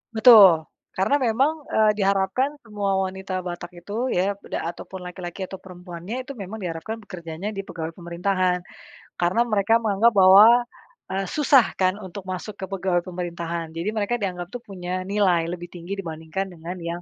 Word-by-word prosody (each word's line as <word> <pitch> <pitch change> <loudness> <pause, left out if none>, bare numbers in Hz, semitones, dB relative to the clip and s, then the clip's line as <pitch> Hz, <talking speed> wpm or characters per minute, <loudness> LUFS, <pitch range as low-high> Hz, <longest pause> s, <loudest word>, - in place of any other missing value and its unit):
Betul, 205 -9 +8 0.2
karena 190 +9 +1
memang, 280 +7 +1
eee, 215 -1 +4
diharapkan 200 +8 +1
semua 205 -3 -2 0.2
wanita 190 0 -4
Batak 175 0 -6
itu 200 +4 -9 0.2
ya, 195 +3 +1
beda - - -4
ataupun 175 +2 -7
laki-laki 180 +1 -8
atau 190 - -7
perempuannya 180 +2 -8
itu 275 - -7
memang 210 0 -7
diharapkan 180 +4 -5
bekerjanya 175 -3 -7
di 195 - -4
pegawai 165 -1 -6
pemerintahan, 180 +1 0 0.6
karena 180 +7 +2
mereka 220 0 +3
menganggap 225 0 +3
bahwa, 195 +3 +9 0.7
eee, 195 0 -1
susah 280 -4 +5
kan 185 -1 +3
untuk 190 0 -8
masuk 185 +3 -6
ke 190 - -5
pegawai 185 -2 -1
pemerintahan 170 -2 -4
jadi 170 +5 -1
mereka 220 +2 0
dianggap 180 -3 -3
tuh 245 - -7
punya 185 -2 -5
nilai 190 -4 +2
lebih 175 -1 -7
tinggi 175 +2 -7
dibandingkan 165 +3 -5
dengan 170 +2 -7
yang, 170 +1 -4
190 Hz, 160 wpm, -24 LUFS, 175-205 Hz, 0.7 s, bahwa